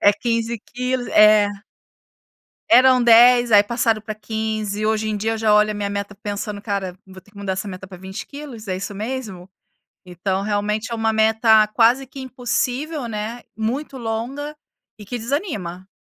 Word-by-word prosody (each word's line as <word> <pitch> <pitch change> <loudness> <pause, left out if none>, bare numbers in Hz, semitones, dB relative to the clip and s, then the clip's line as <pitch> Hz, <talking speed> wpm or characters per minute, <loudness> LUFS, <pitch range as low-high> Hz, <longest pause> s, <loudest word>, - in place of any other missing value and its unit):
é 205 - +6
15 230 +2 -2
quilos. 250 +2 -3
É. 210 -1 +6 1.2
Eram 255 0 +6
10, 240 +1 +6
aí 205 -1 +8
passaram 230 -1 0
pra 215 0 -6
15, 215 -1 -3
hoje 220 0 0
em 215 - -1
dia 220 +2 -1
eu - - -3
já 215 -1 +2
olho 210 0 +4
a - - -2
minha 205 -1 -3
meta 200 0 -4
pensando 205 0 -5
"cara, 195 -4 -3
vou 190 -1 -13
ter 195 - -24
que 205 - -18
mudar 200 -2 -3
essa 190 +2 -4
meta 190 0 -8
para 185 -1 -11
20 190 +3 -8
quilos, 275 -7 -10
é 185 - -1
isso 195 +2 -6
mesmo?" 215 -5 -5 0.6
Então 185 +2 -3
realmente 210 +2 -1
é - - -2
uma 225 -1 0
meta 220 0 +4
quase 240 +5 +3
que 270 +2 -10
impossível, 260 +3 -2
né, 220 +2 -5
muito 260 +5 -3
longa, 250 +6 -4 0.4
e 210 - -10
que 240 +5 -5
desanima. 215 - -4
220 Hz, 175 wpm, -21 LUFS, 205-240 Hz, 1.2 s, aí